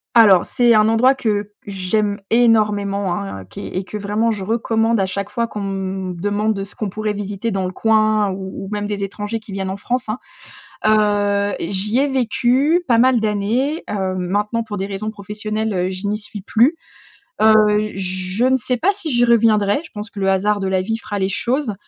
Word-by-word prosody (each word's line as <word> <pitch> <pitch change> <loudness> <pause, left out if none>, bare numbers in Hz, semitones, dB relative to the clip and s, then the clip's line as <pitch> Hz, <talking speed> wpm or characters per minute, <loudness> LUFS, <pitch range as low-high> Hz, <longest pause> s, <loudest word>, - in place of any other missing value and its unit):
Alors, 205 -6 +7
c'est 240 -2 +3
un 215 0 +4
endroit 250 +4 +4
que 210 -4 -1
j'aime 200 +1 -1
énormément, 210 -5 +2
hein, 95 - -6
qui 95 - -10
est - - -6
et 190 - -1
que 210 +3 -6
vraiment 210 +3 0
je 210 -4 -2
recommande 225 +1 +1
à 190 - +1
chaque 200 +2 -4
fois 230 +2 -1
qu'on 210 - -6
me 190 -1 -3
demande 205 +3 -1
ce 200 - -11
qu'on 215 - -3
pourrait 215 +2 -2
visiter 205 +2 -4
dans 195 -2 -1
le 185 - -3
coin 215 0 +2
ou 190 0 -6
ou - - -8
même 205 0 -2
des 205 -1 -3
étrangers 205 +3 -4
qui 215 -1 -13
viennent 190 -1 -3
en 195 - -4
France, 245 +3 -3
hein. 220 - -2 0.7
Heu, 205 -1 +2
j'y 200 +7 0
ai 285 - +2
vécu 265 +5 +2
pas 235 -2 +4
mal 255 0 +4
d'années, 220 +8 0
hem, 190 -2 -2
maintenant 205 +5 -1
pour 215 -2 -6
des 195 - -2
raisons 205 +2 -4
professionnelles, 210 -2 -3
je 190 +2 -4
n'y 210 +1 0
suis 210 0 -9
plus, 240 - +3 0.7
heu, 215 -1 +4
je 185 +4 -1
ne 260 - +4
sais 250 0 -1
pas 395 - +2
si 370 -6 -5
j'y 240 -1 +3
reviendrai. 220 0 +3
Je - - -13
pense 210 0 -6
que 200 - -12
le 195 -1 +1
hasard 205 +2 +1
de 195 - -2
la 190 -1 +1
vie 225 +4 -2
fera 205 -2 -5
les 190 -1 0
choses 240 +3 -1
210 Hz, 205 wpm, -19 LUFS, 195-225 Hz, 0.7 s, Alors